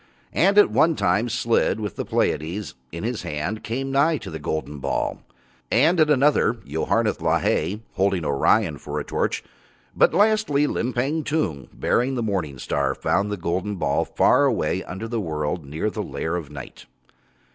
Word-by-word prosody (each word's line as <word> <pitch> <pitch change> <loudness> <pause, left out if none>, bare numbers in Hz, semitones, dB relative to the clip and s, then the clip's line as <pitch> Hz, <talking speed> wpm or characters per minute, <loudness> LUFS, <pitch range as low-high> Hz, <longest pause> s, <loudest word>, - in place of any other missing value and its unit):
And 195 +4 +3
at 205 - +7
one 165 0 +3
time 105 +4 +1
Slid, 115 -2 +1
with 105 -4 -4
the - - -4
Pleiades 85 +5 -1 0.2
in - - -6
his - - -2
hand, 80 +9 -4
came 135 +4 -3
nigh 150 +4 +3
to 110 -7 -8
the 80 - -5
golden 75 0 -4
ball, - - -2 0.5
and 160 +9 +4
at 155 -1 +4
another 145 -4 +4
Yoharneth 75 +3 0
Lahai, 95 +8 +1
holding 95 -3 +1
Orion 70 -2 +2
for 75 +1 -4
a - - -3
torch, - - -2 0.5
but - - +5
lastly 205 -9 +3
Limpang 135 +4 -1
Tung, 95 - -2
bearing 130 +3 0
the 120 - -1
morning 90 -10 -2
star, - - -1
found 100 +1 0
the 105 - -2
golden 90 +4 -2
ball 90 - 0
far - - +3
away - - 0
under 95 +5 -6
the 115 -1 -2
world 75 -2 -3
near 75 +6 -4
to 105 - +1
the - - -4
lair 80 +2 -3
of 80 -5 -5
Night. 70 -4 -10
105 Hz, 170 wpm, -23 LUFS, -, 0.5 s, at